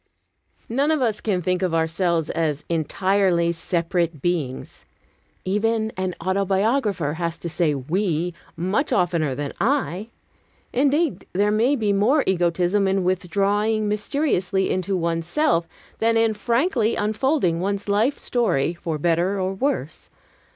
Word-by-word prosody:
None 275 +6 +1
of 315 -1 +2
us 225 -5 0
can 185 -5 -1
think 180 +2 0
of 180 -3 0
ourselves 165 0 0
as 150 -3 -1
entirely 170 +1 +1
separate 170 -1 -1
beings. 150 -5 -3 0.6
Even 220 +3 0
an 185 -1 -2
autobiographer 195 - 0
has 170 -1 -2
to - - -6
say 165 -2 0
"we" 170 +4 -1 0.2
much 190 - 0
oftener 170 -6 +1
than 145 0 -4
"I." 225 -5 0 0.6
Indeed, 290 +4 +1
there 205 +3 +2
may 235 +7 +3
be 215 -5 +1
more 240 +9 +3
egotism 180 +2 +1
in 190 0 +1
withdrawing 200 +4 +1
mysteriously 205 - 0
into 185 +1 -1
one's 165 -1 -1
self, 175 - +1 0.3
than 225 0 +2
in 225 -1 +3
frankly 235 - +1
unfolding 215 - +1
one's 200 +2 -2
life 215 +8 +2
story, 180 - 0
for 165 -2 -4
better 175 +5 +1
or 190 0 -1
worse. 190 - -3
190 Hz, 130 wpm, -23 LUFS, 170-220 Hz, 0.6 s, may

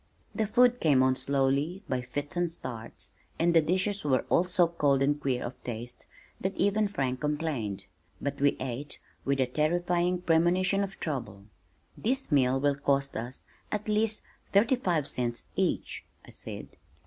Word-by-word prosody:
The 220 -2 0
food 245 +3 +4
came 140 -5 +4
on 130 0 +3
slowly, 140 +8 +1
by 130 -1 -1
fits 145 +5 -4
and 175 -1 0
starts, 120 -8 -6 0.3
and 170 +1 +3
the 165 - +6
dishes 185 +5 0
were 130 -4 +2
all 175 - +4
so 180 -1 +3
cold 145 -5 +2
and 145 +1 +1
queer 130 -3 0
of 125 +2 -8
taste 120 +1 -6 0.3
that 190 +1 -2
even 205 +2 +2
Frank 130 -9 -2
complained. 145 -11 -2 0.3
But 140 0 -3
we 140 0 +3
ate 130 +3 -4 0.3
with 140 0 +1
a 130 - +4
terrifying 175 +6 +1
premonition 180 +4 +3
of 195 -1 -6
trouble. 110 -10 -4 0.5
"This 260 -2 -1
meal 135 -2 +4
will 145 +1 +3
cost 140 -1 +1
us 120 +4 -5 0.3
at 210 0 -2
least 215 0 +1 0.3
thirty 225 +6 +4
five 175 - 0
cents 120 -1 -2
each!" - - -1 0.2
I - - -13
said. - - -8
150 Hz, 160 wpm, -29 LUFS, 130-185 Hz, 0.5 s, the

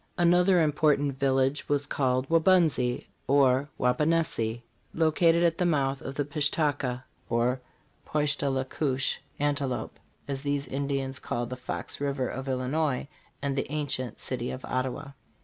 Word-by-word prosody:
Another 175 +1 +5
important 145 -2 +2
village 135 +1 +1
was 145 0 +2
called 130 -2 0
Waubunsee 165 -7 +3 0.2
(or 135 0 +4
Wauponehsee), 125 -4 +1 0.3
located 165 +1 +3
at 165 -1 +2
the 180 - +2
mouth 135 -4 +1
of 135 - -6
the 145 - -1
Pish 150 0 +1
ta 150 -2 +2
ka 130 -2 -4 0.3
(or 120 +2 +1 0.4
Poish 150 -1 +1
tah 140 - -2
le 135 -1 0
koosh: 135 -1 -1 0.2
antelope), 140 -5 -1 0.3
as 135 -1 -3
these 145 -1 -1
Ind 140 +1 -3
ians 135 -1 -2
called 120 0 -3
the - - -2
Fox 130 +2 -5
river 140 -3 0
of 135 +3 -5
Illinois, 130 +2 0 0.4
and 140 -1 0
the 140 - -2
ancient 140 -5 -2
city - - -3
of 65 - -6
Ottawa. 130 +2 -3
140 Hz, 150 wpm, -28 LUFS, 130-150 Hz, 0.4 s, Another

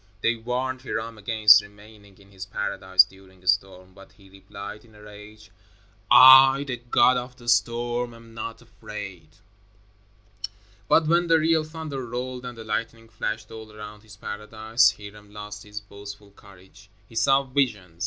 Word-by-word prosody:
They 115 - +1
warned 125 +3 -4
Hiram 115 -3 -5
against 110 0 +6
remaining 105 -1 -17
in 100 0 -21
his 95 -1 -9
paradise 95 -2 +2
during 95 -1 -19
a - - -17
storm, 95 -1 -1
but 100 +1 -17
he 95 -2 -21
replied, 100 +2 -10
in 110 -2 -21
a 105 - -16
rage: 105 0 -14 0.6
"I, 135 +1 +8
the 130 -3 -4
God 120 +1 +3
of 125 +1 -6
the 120 -1 -16
storm, 120 0 0
am 115 0 -16
not 115 +1 -7
afraid." 105 -7 -10 1.6
But 160 - +4
when 170 +2 +2
the 165 -1 +4
real 160 0 +2
thunder 155 -4 -7
rolled 125 +1 -6
and 120 -1 -8
the 115 - -8
lightning 115 +1 -5
flashed 110 -1 -5
all 110 -1 -10
around 105 0 -11
his 105 -1 -16
paradise, 110 +3 0
Hiram 105 0 -13
lost 105 0 -9
his 105 0 -8
boastful 100 0 -12
courage. 95 0 -19 0.2
He - - -19
saw 135 +5 +3
visions. 115 -11 -2
110 Hz, 160 wpm, -24 LUFS, 100-120 Hz, 1.6 s, I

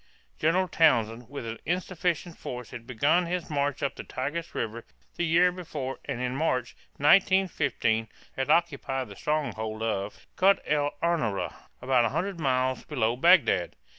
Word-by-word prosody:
General 180 +4 +2
Townshend 120 -9 +2
with 140 -3 -6
an 115 0 -5
insufficient 175 -1 -2
force 125 -2 -7
had 115 -1 -9
begun 150 +8 +2
his 175 -1 -3
march 145 -1 -1
up 140 - 0
the - - -7
Tigris 150 +6 -4
River 115 +1 -3 0.3
the - - -1
year 175 +2 +4
before 150 -7 -5
and 135 -4 -4
in 125 0 -2
March, 130 -5 -1 0.2
1915, 145 - +3 0.3
had 135 -1 -2
occupied 135 -5 +1
the - - -10
stronghold 110 -8 -2
of 105 -2 -3
Kut 195 +1 +5
el 145 -1 0
Ama´ra, 155 - 0 0.3
about 130 -1 +3
100 175 - -2
miles 130 -3 0
below 120 -6 0
Bagdad. 135 - +4
140 Hz, 145 wpm, -27 LUFS, 120-170 Hz, 0.3 s, Kut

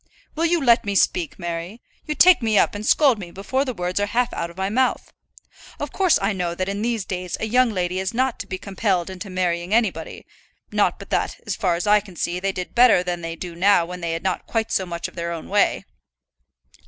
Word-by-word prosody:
"Will 330 +2 +1
you 345 0 +2
let 240 -5 +4
me 200 -1 -3
speak, 180 -3 +1
Mary? 175 +4 -5 0.3
You 305 - -2
take 360 -1 +6
me 220 -2 +2
up - - +3
and 205 0 -5
scold 265 -1 +4
me 180 -3 -7
before 200 +9 -2
the 260 -3 -3
words 180 +1 -2
are 205 - 0
half 240 +3 0
out 170 - -3
of 170 - -15
my 190 0 -1
mouth. 250 +5 0 0.7
Of - - -4
course 375 -4 +3
I 200 +2 0
know 175 -2 -2
that 185 +1 -2
in 200 +1 -3
these 230 -3 -1
days 180 -2 -4
a - - -1
young 250 +3 +3
lady 185 -3 -2
is 190 0 -2
not 255 +1 0
to 200 - -6
be 185 - -4
compelled 190 -2 -1
into 190 +2 -8
marrying 180 +1 -1
anybody; 190 -9 -1 0.5
not - - +2
but - - -12
that, - - -1
as - - -2
far 185 -6 +1
as 170 - -3
I 210 0 +5
can 195 -3 -13
see, 175 +2 -2
they 195 +1 -1
did 180 -1 -6
better 240 -7 +5
than 175 -1 -3
they 165 0 -5
do 175 0 -7
now 175 0 +3
when 180 +1 -8
they 170 -1 -2
had 165 - -4
not 190 -1 -2
quite 225 -1 -1
so 190 - 0
much 170 0 -4
of - - -15
their 170 0 -4
own 165 -2 -6
way." 205 +1 +2
190 Hz, 240 wpm, -22 LUFS, 175-225 Hz, 0.7 s, take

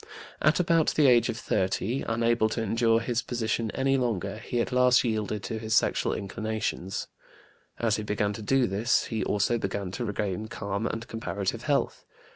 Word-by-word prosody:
At 155 +3 +3
about 165 -3 +3
the 150 - +4
age 120 -3 +5
of - - -2
30, 100 +6 -1
unable 115 -1 +2
to 115 - -2
endure 115 +1 +2
his 120 0 -1
position 115 -2 -2
any 135 0 +2
longer, 110 -5 -2
he 120 - -3
at 115 - -1
last 125 0 +4
yielded 110 -3 -2
to 110 -2 -4
his 110 0 -1
sexual - - +2
inclinations. 105 -2 -3 0.7
As 115 -2 +1
he 110 - -4
began 105 0 -1
to 110 - -7
do 130 +4 +2
this, 105 +5 +1
he 110 -2 -2
also 105 +3 +1
began 100 -2 -3
to 120 +6 -4
regain 105 -1 -2
calm 100 0 -3
and 115 0 -4
comparative 100 -3 -3
health. - - 0
110 Hz, 175 wpm, -27 LUFS, 105-120 Hz, 0.7 s, age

